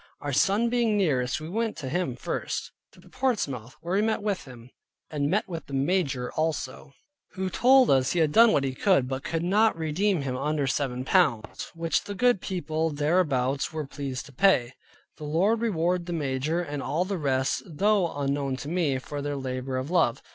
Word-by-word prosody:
Our 145 -1 -4
son 200 - +3
being 235 -3 +1
nearest, 135 -9 +1
we 155 - -7
went 225 +5 -2
to 145 -5 -5
him 175 +7 -1
first, - - -4 0.2
to - - -18
Portsmouth, 140 - -2
where 175 +2 -4
we - - +3
met 220 -1 0
with 205 -3 -2
him, 125 -2 -13 0.4
and 145 -1 -1 0.2
with 165 -3 -6
the 140 - -5
Major 135 -4 0
also, 150 -3 -3 0.4
who 190 -1 -3
told 255 +5 +5
us 130 -1 +3
he - - -2
had 160 -3 +3
done 230 +5 +7
what 140 - +2
he 135 -1 -1
could, 140 -3 +2
but 130 +1 -4
could 165 0 -2
not 210 +3 +3
redeem 165 +2 0
him 130 -2 -2
under 145 +2 -1
seven 130 -2 -2
pounds, 110 -4 +1
which 165 0 -1
the 205 - -5
good 245 -2 +3
people 165 -3 -2
thereabouts 145 -4 +1
were 155 -1 -4
pleased 135 -2 -5
to 140 - -13
pay. 135 -6 +3 0.4
The - - -10
Lord 190 +10 +1
reward 180 -5 0
the 175 - -3
major, 150 +2 -1
and 145 -3 -5
all 170 +6 -1
the 190 -1 -3
rest, 135 -2 0
though 190 +2 +1
unknown 140 -1 -1
to 135 - -7
me, 160 -6 +1
for 145 +2 -6
their 145 0 -3
labor 130 0 -3
of 130 +5 -4
Love. 170 -10 +2
155 Hz, 190 wpm, -26 LUFS, 135-185 Hz, 0.4 s, done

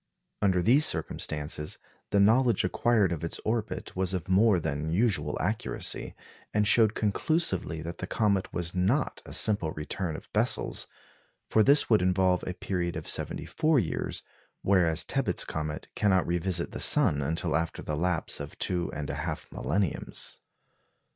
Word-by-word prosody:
Under 95 -3 +2
these 135 - +5
circumstances, 75 -1 -2 0.3
the 100 - +2
knowledge 115 +4 +4
acquired 110 -6 +2
of 85 -2 -3
its 85 - -2
orbit 110 0 -3
was 95 0 0
of 90 - -4
more 95 +1 +4
than 75 -1 -3
usual 85 -6 +1
accuracy, 105 +7 -2 0.4
and 105 0 +3
showed 110 -1 +4
conclusively 100 - 0
that 85 +1 -7
the 90 - -4
comet 100 -3 0
was 85 -1 -3
not 95 +11 0
a - - -9
simple 100 -7 0
return 80 +2 -4
of - - -11
Bessel's; - - +1 0.6
for 110 - +5
this 140 +7 +5
would 110 -4 +4
involve 90 0 +2
a 90 - -3
period 90 -3 -2
of - - -6
seventy - - -1
four 155 -1 +1
years, 100 -10 -2 0.4
whereas 90 -5 +3
Tebbutt's - - 0
comet 75 -1 -4
cannot 95 -3 +2
revisit 85 0 0
the - - -6
sun 70 -1 +4
until 80 +2 -1
after 80 +1 -2
the 75 - -3
lapse 85 +1 0
of 70 0 -8
two 90 -2 -1
and 75 -1 -4
a - - -3
half 80 -1 -5
millenniums. 80 +6 -1
90 Hz, 155 wpm, -28 LUFS, 80-105 Hz, 0.6 s, these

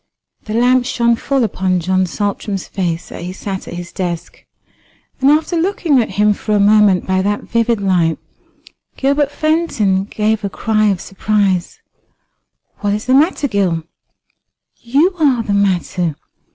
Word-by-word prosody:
The 215 - -4
lamp 250 +1 +3
shone 235 -2 +2
full 270 +2 0
upon 185 -3 0
John 185 +2 0
Saltram's 200 +1 -3
face 170 -4 -3
as - - -8
he 175 +1 -5
sat 190 0 -6
at - - -7
his 175 0 -7
desk; 175 -3 -5 0.8
and 270 +1 +4
after 310 +4 +2
looking 330 -6 +2
at 225 - -3
him 210 0 +4
for 210 +1 -2
a - - +3
moment 205 -2 +4
by 190 0 +1
that 205 +2 -1
vivid 230 -1 0
light, 180 -5 +1 0.8
Gilbert 280 +1 +1
Fenton 290 - 0
gave 215 0 -1
a 200 - -1
cry 215 +1 0
of 195 -3 +1
surprise. 195 -3 -1 1.0
"What 205 -1 0
is 210 - -5
the 255 - +2
matter, 295 +1 +3
Gil?" 185 - 0 0.9
"You 285 +11 +1
are 265 -7 +2
the 205 - -2
matter. 180 -4 0
210 Hz, 150 wpm, -17 LUFS, 190-250 Hz, 1.0 s, and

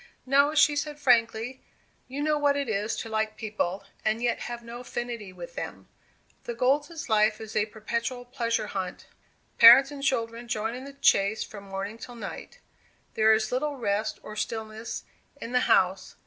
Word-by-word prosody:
"No," 280 +3 +4
she 300 -1 +5
said, 295 0 -3
frankly. 240 -2 +2 0.5
"You 275 +3 -4
know 305 0 +2
what 290 -1 +2
it 280 -2 -1
is 215 0 -1
to - - -5
like 220 -1 -2
people, 205 -3 -3 0.2
and 215 +1 +1
yet 240 0 0
have 240 0 -6
no 235 +1 -8
affinity 240 -4 -5
with - - -10
them. - - -7 0.6
The 235 - -4
Golds' 290 +7 0
life 215 -1 +3
is 220 -1 -9
a 215 0 +2
perpetual 235 +3 -4
pleasure 240 -3 -1
hunt. 190 -3 -5 0.5
Parents 250 +5 +10
and 285 -1 -7
children 235 -3 -1
join 225 -1 -2
in 255 +2 -7
the 280 - -9
chase 215 -6 +3
from 200 -2 -10
morning 195 +3 -5
till 245 +1 -9
night; 235 - -8 0.6
there 220 0 +4
is 220 0 +2
little 285 +3 -1
rest 215 -3 -1
or 215 - -8
stillness 220 +1 -4 0.4
in 230 - -6
the 250 - +3
house. 190 +1 +2
230 Hz, 175 wpm, -27 LUFS, 215-265 Hz, 0.6 s, Parents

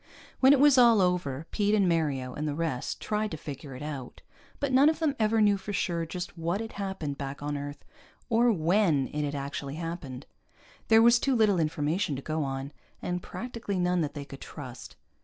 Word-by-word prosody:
When 265 +1 +7
it 285 - +5
was 285 -2 +6
all 235 -3 +7
over, 175 -6 0
Pete 205 0 +2
and 200 -3 +3
Mario 145 -7 0
and 150 +3 -3
the 145 - -2
rest 155 -6 -2
tried 215 0 -1
to 160 - -5
figure 140 -2 -8
it 130 - -8
out, 140 -4 -7 0.4
but 280 -2 -1
none 270 +4 +6
of 315 - 0
them 310 -3 0
ever 220 0 +3
knew 205 -1 +4
for 200 +2 -6
sure 170 -4 -1
just 180 +2 -6
what 170 +3 -1
had 225 0 -5
happened 190 -8 -4
back 140 0 -5
on 145 0 -2
Earth, 145 0 -6 0.4
or 235 0 +4
when 165 - +2
it 150 0 -2
had 145 0 -2
actually 140 0 -4
happened. 160 -6 -6 0.6
There 225 0 +6
was 235 +1 +6
too 270 0 +1
little 210 -5 +3
information 155 +1 0
to 135 - -5
go 155 0 -1
on, 135 +1 -4 0.3
and 180 0 -3
practically 230 -4 -5
none 180 0 +1
that 150 -1 -3
they 145 -1 -5
could 135 -1 -11
trust. 130 -5 -9
170 Hz, 205 wpm, -28 LUFS, 145-215 Hz, 0.6 s, When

